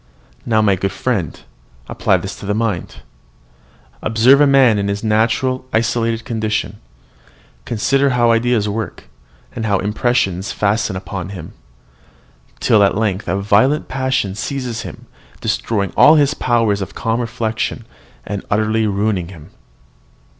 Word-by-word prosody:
"Now, 110 -2 +3
my 100 -2 +3
good 95 +1 -2
friend, 95 - -2 0.5
apply - - +1
this - - -6
to - - -9
the 105 - 0
mind; 110 -6 -3 1.0
observe 120 +6 +4
a 145 - +6
man 130 -6 +5
in 100 - -1
his 100 +1 -3
natural, 115 +4 +1
isolated 115 0 0
condition; 110 -2 -2 0.9
consider 135 +5 +1
how 120 -2 +3
ideas 115 -2 +1
work, 110 +1 -4 0.5
and 115 - -3
how 100 -1 +2
impressions 105 -2 0
fasten 105 0 0
on 95 -1 -6
him, 90 -5 -9 1.1
till 110 - +3
at 100 0 +3
length 105 -3 -1
a 95 +3 0
violent 105 +9 +2
passion 130 -6 -1
seizes 125 +1 -4
him, - - -9 0.3
destroying 100 -5 -1
all 155 +2 +7
his 145 -2 +3
powers 115 -7 +1
of 95 - -6
calm 115 +1 -1
reflection, 115 0 -3 0.4
and 100 -1 -4
utterly 110 +1 +1
ruining 100 -3 -1
him. 85 -5 -13
110 Hz, 135 wpm, -18 LUFS, 100-120 Hz, 1.1 s, all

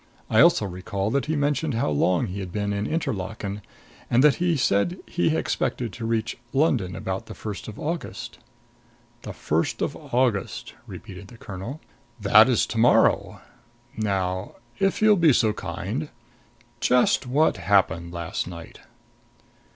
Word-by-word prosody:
I - - +4
also - - +5
recall 95 +2 -3
that 140 +3 0
he 160 - 0
mentioned 145 -1 0
how 115 -9 0
long 85 +4 +2
he 95 +2 -5
had 95 -3 -6
been 100 +1 -2
in 100 +1 -2
Interlaken, 105 - -3 0.5
and 120 +3 +4
that 150 -2 +5
he 175 -2 +1
said 135 - +1
he 165 -2 0
expected 120 -4 -2
to 115 -1 -5
reach 115 0 -1
London 130 - +1
about 95 0 -4
the - - -9
first 105 -2 -6
of 110 - -8
August." 165 +2 -5 0.8
"The - - -7
first 80 +2 -1
of - - -2
August," 120 -5 -1
repeated 95 +1 -10
the 115 - -14
colonel. 105 +9 -7 0.4
"That - - +6
is - - +3
to - - -4
morrow. - - +3 0.5
Now 95 -3 -2 0.2
if 195 +2 +1
you'll 215 -1 +6
be 165 -5 +5
so 110 -3 +2
kind 105 - -4 0.7
just 125 +1 +3
what 145 0 +2
happened 85 -2 +1
last 85 0 -4
night?" 85 -2 -10
110 Hz, 150 wpm, -24 LUFS, 95-140 Hz, 0.8 s, That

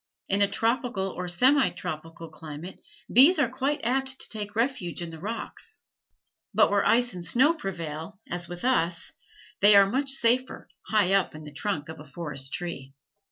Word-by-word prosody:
In 195 +1 +1
a 200 - +5
tropical 230 -3 -1
or 180 0 -6
semi 260 +10 +4
tropical 165 -1 -7
climate 155 +3 -9 0.3
bees 280 +10 +7
are 280 -5 +2
quite 270 +4 -2
apt 265 +2 0
to - - -4
take 210 -1 -5
refuge 230 -7 -1
in 170 -1 -6
the 160 - -10
rocks, 230 - -6 0.8
but - - +4
where 200 0 +2
ice 245 +1 +2
and 180 -1 -7
snow 260 - +3
prevail, 170 - -6
as 175 0 -4
with 175 +6 -7
us, 175 -10 0 0.5
they 205 +1 +7
are 200 0 +8
much 265 +6 0
safer 255 0 +2 0.2
high 205 -3 +3
up 195 -5 +1
in 155 - -9
the 150 -1 -11
trunk 155 -2 -3
of 160 -1 -9
a - - -10
forest 140 -3 -5
tree. 140 -6 -6
195 Hz, 175 wpm, -26 LUFS, 165-250 Hz, 0.8 s, are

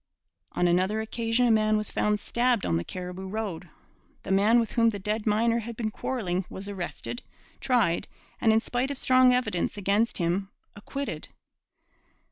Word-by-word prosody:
On 180 - +2
another 185 +5 +2
occasion 230 +2 0
a 240 - +4
man 215 -1 +3
was 210 - -3
found 210 0 +1
stabbed 240 0 +1
on 85 - +1
the 85 - -2
Cariboo 180 - -6
Road. 190 -4 -4 0.5
The - - -5
man 210 +5 +5
with 230 -2 -1
whom 230 -1 +4
the 210 - -3
dead 210 +3 -2
miner 230 +2 +2
had 230 0 -7
been 220 -2 -2
quarrelling 195 -8 -2
was 195 +1 -6
arrested, 200 +5 -5 0.4
tried, 230 -10 +1 0.3
and, 225 - +5
in 220 0 +4
spite 245 +3 -1
of 280 - -4
strong 255 -1 +5
evidence 250 -8 0
against 205 +4 +1
him, 185 +3 0 0.3
acquitted. 275 +7 -5
215 Hz, 165 wpm, -27 LUFS, 190-235 Hz, 0.5 s, man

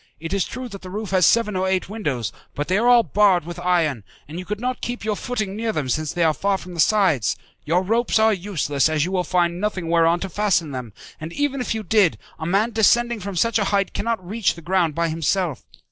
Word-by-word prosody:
It 165 +3 -5
is 200 -2 +1
true 255 +1 -6
that 200 -3 -9
the 185 - -9
roof 210 +1 -5
has 185 -3 +4
seven 230 -3 +2
or 185 0 0
eight 190 -1 0
windows, 145 - -3 0.2
but 145 - -3
they 185 +3 +2
are 235 - +2
all 245 -1 +6
barred 185 -1 +3
with 175 +1 -7
iron, 165 - +1 0.2
and 160 +4 -7
you 185 - -7
could 210 +2 -4
not 250 +2 -3
keep 245 -2 -4
your 215 -1 0
footing 215 -4 -3
near 225 +1 -1
them 150 -10 -3
since 155 +4 -1
they 175 - 0
are 160 -1 +3
far 195 +4 0
from 180 -1 -10
the 170 - -8
sides. 175 - +3 0.3
Your 175 +4 +2
ropes 230 +5 +1
are 220 0 +4
useless, 170 -7 0
as 155 -1 +1
you 185 - -4
will 185 -2 0
find 175 0 0
nothing 190 -5 -2
whereon 170 0 +3
to 195 - -3
fasten 180 -6 +1
them; 125 -4 -6 0.3
and 155 +2 -6
even 285 -2 -1
if 245 - -2
you 220 - -4
did, 205 -3 +3 0.2
a 160 - -4
man 200 +6 +2
descending 235 +1 +3
from 200 0 -6
such 230 +6 +2
a 205 - +1
height 200 0 0
cannot 225 -5 -2
reach 215 +1 0
the 170 - -12
ground 170 -3 +1
by 170 0 +1
himself. 165 - -1
185 Hz, 245 wpm, -22 LUFS, 165-215 Hz, 0.3 s, all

